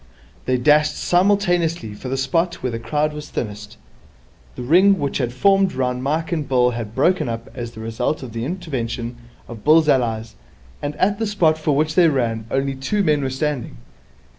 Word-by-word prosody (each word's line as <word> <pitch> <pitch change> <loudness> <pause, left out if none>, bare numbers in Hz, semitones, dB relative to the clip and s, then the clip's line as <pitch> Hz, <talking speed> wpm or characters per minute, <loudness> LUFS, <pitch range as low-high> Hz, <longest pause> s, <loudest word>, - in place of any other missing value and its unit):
They 130 0 +1
dashed 150 +3 +3
simultaneously 175 - +1
for 125 +5 -8
the 135 - -1
spot 165 +6 -1
where 125 - -1
the 115 - -4
crowd 150 +6 -1
was 150 0 -8
thinnest. 105 -2 -6 0.8
The - - -6
ring 185 +9 +5
which 145 -2 -2
had 120 -2 -1
formed 195 +7 +3
round 125 -1 -1
Mike 155 +5 -1
and 155 -5 -2
Bill 125 -2 +3
had 115 -2 -6
broken 155 0 +2
up 115 0 -6
as 120 -2 -6
the 110 - -9
result 115 +6 -2
of 120 -4 -8
the 115 0 -3
intervention 125 -8 -4 0.3
of 115 -3 -10
Bill's 155 +1 +5
allies, 115 -5 +1 0.5
and 145 0 -3
at 200 +2 +1
the 225 - 0
spot 175 -7 +2
for 155 -2 0
which 155 +2 +1
they 175 0 +5
ran 115 -6 -1
only 135 0 0
two 135 +11 -1
men 150 -4 +2
were 135 - -1
standing. 140 0 -3
140 Hz, 190 wpm, -21 LUFS, 120-165 Hz, 0.8 s, ring